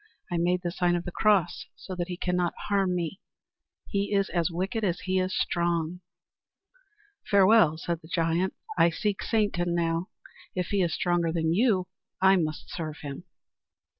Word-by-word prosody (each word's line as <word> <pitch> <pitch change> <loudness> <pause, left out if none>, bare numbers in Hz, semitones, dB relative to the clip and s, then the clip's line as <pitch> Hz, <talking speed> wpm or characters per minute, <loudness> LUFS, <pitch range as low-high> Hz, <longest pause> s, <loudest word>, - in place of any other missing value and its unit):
"I 175 - 0
made 180 +1 +1
the 175 - -1
sign 175 0 +1
of 175 - -2
the 175 - -4
cross 195 -3 +2
so 190 - -8
that 175 -1 -3
he 180 -1 -5
cannot 180 -1 0
harm 195 -3 +2
me. 175 +2 -3 0.7
He 200 0 -2
is 195 0 +2
as 170 -1 0
wicked 190 +6 -2
as 180 -4 0
he 185 0 0
is 185 0 -1
strong." 170 0 0 1.3
"Farewell," 200 -5 +5
said 170 0 -3
the 160 - -14
giant. 170 +2 +1 0.2
"I 165 +1 +6
seek 200 +4 -2
Satan 180 -6 0
now. 165 +1 0 0.5
If 180 -2 -2
he 200 -1 +1
is 170 -2 +1
stronger 175 -2 +1
than 160 -1 +1
you, 195 -3 +2 0.3
I 190 0 +6
must 155 -3 -3
serve 155 -2 -5
him." 145 +5 -7
175 Hz, 165 wpm, -27 LUFS, 170-190 Hz, 1.3 s, I